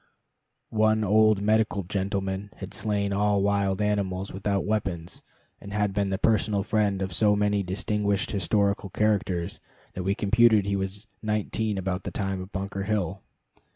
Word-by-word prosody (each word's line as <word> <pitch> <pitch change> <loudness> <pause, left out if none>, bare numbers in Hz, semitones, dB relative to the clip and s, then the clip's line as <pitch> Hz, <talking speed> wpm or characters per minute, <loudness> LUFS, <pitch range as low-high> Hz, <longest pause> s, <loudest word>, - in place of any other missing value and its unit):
One 110 0 +3
old 105 0 +4
medical 110 -2 +2
gentleman 95 +1 -2
had 95 0 -8
slain 100 -2 0
all 100 0 +2
wild 100 0 +1
animals 100 -2 -1
without 100 +1 -1
weapons, 95 -6 -2 0.4
and 100 - -9
had 105 -1 0
been 100 -1 0
the 95 - -1
personal 105 -2 +2
friend 100 -3 +1
of 95 -2 -4
so 105 +3 +3
many 105 0 +1
distinguished 100 +4 -1
historical 100 0 +1
characters 95 -4 0 0.3
that 95 - -4
we 95 +2 0
computed 110 -1 +4
he 100 0 0
was 95 +2 -3 0.2
nineteen 105 0 -1
about 95 -1 -2
the - - -5
time 95 -2 -3
of 95 +2 -9
Bunker 100 0 -4
Hill. 100 -3 -1
100 Hz, 155 wpm, -26 LUFS, 95-105 Hz, 0.4 s, old